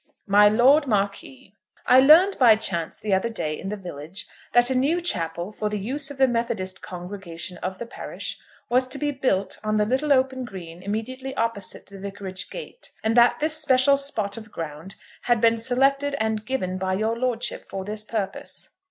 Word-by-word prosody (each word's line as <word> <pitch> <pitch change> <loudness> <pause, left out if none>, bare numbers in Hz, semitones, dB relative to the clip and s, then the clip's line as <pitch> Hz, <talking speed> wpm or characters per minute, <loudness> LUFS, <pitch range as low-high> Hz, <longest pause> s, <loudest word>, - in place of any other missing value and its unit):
MY 205 +1 +6
LORD 265 +7 +5
MARQUIS, 200 - -2 0.3
I 255 - +7
learned 325 +9 +6
by 235 -4 +7
chance 170 -6 -2
the 210 -2 -1
other 190 +5 +1
day 155 -9 -3
in 195 - -5
the 210 - -3
village 175 -1 -6 0.3
that 245 +1 +5
a - - +1
new 285 +7 +2
chapel 175 - 0
for 210 0 -3
the 210 - -1
use 270 +8 -2
of 285 - -8
the 265 0 +5
Methodist 230 -6 -2
congregation 180 -1 -6
of 185 +2 -5
the 235 - -6
parish 235 - -6 0.3
was 255 +1 +3
to 255 - 0
be 290 0 -1
built 255 -8 -1
on 215 0 0
the 210 - +3
little 265 +6 0
open 260 -1 +2
green 180 -7 -9
immediately 255 +7 -4
opposite 230 -4 -2
the 195 0 -12
Vicarage 195 -1 -6
gate, - - -8
and 220 +1 +1
that 240 0 +5
this 310 +1 +1
special 275 -2 +4
spot 230 -7 -2
of 220 -2 -10
ground 165 +4 -7 0.3
had 240 -1 +3
been 230 0 +3
selected 275 +4 +2
and 220 0 -1
given 185 -8 -2
by 185 0 -1
your 220 +3 0
lordship 240 -1 -2
for 190 -1 -5
this 210 +1 -5
purpose. 215 -3 -4
220 Hz, 185 wpm, -24 LUFS, 195-260 Hz, 0.3 s, I